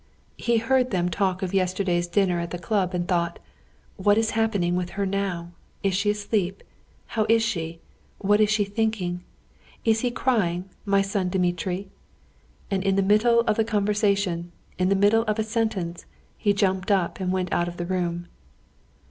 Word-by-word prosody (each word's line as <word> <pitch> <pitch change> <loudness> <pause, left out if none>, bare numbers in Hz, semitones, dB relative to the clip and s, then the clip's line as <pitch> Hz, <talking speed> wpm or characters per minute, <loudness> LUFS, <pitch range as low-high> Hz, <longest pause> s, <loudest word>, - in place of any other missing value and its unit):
He 235 -1 +2
heard 255 +2 +2
them 180 -4 0
talk 190 +1 0
of 185 - -3
yesterday's 185 -2 +1
dinner 180 -1 +1
at 170 0 -3
the 175 - -4
club, 185 -1 -1
and 175 0 -1
thought: 170 -2 0 0.6
"What 205 +1 +3
is 225 0 +2
happening 205 -6 +1
with 180 -1 -1
her 200 - +1
now? 190 -3 -2 0.3
Is 195 -1 +2
she 200 +3 +1
asleep? 205 -2 -1 0.5
How 215 -2 +1
is 225 0 +5
she? 165 -7 -3 0.4
What 205 +1 +3
is 210 - +4
she 215 -1 +2
thinking 205 -3 -1
of? 175 - -6 0.7
Is 225 -1 +3
he 245 - 0
crying, 205 -9 0 0.2
my 200 -1 +3
son 195 -2 -1
Dmitri?" 180 +1 -1 0.8
And 190 -1 0
in 195 -1 +2
the 195 - +3
middle 220 +4 +4
of 215 -2 0
the 225 - +3
conversation, 200 -5 0 0.3
in 185 0 +2
the 195 - +3
middle 205 +3 +4
of 215 -1 0
a 220 - +1
sentence, 215 -6 -2 0.3
he 205 - +1
jumped 190 -1 0
up 190 -3 +1
and 185 -1 -1
went 185 -1 -1
out 175 - +1
of 175 0 -6
the 175 - -3
room. 175 -1 -2
195 Hz, 180 wpm, -25 LUFS, 180-215 Hz, 0.8 s, is